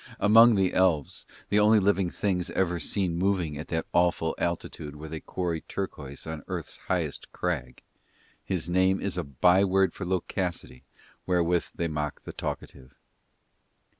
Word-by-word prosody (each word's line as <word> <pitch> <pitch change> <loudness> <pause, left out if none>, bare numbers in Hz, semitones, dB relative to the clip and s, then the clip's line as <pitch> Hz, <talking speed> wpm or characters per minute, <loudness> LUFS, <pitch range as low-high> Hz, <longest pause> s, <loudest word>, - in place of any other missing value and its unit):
Among 115 +2 +7
the 95 -2 +2
elves, 90 -6 +1 0.2
the 105 - +4
only 105 +1 +6
living 100 -2 +2
things 90 -2 -1
ever 90 -2 0
seen 90 -2 -1
moving 90 -5 0
at 75 +2 -6
that 80 -1 -2
awful 85 -2 +2
altitude 80 -3 -3
where 75 +1 -8
they 80 0 -5
quarry 85 0 -3
turquoise 70 -8 -6
on 80 -1 -5
Earth's - - -4
highest - - -2
crag, 70 -9 -3 0.6
his 90 -4 -2
name 95 +2 +3
is 100 -3 -2
a 90 - -1
byword 95 +7 +3
for - - -6
loquacity 90 -7 -3 0.4
wherewith 90 -1 +2
they 85 - -1
mock 75 -2 -4
the - - -8
talkative. 65 -1 -6
90 Hz, 145 wpm, -27 LUFS, 80-95 Hz, 0.6 s, Among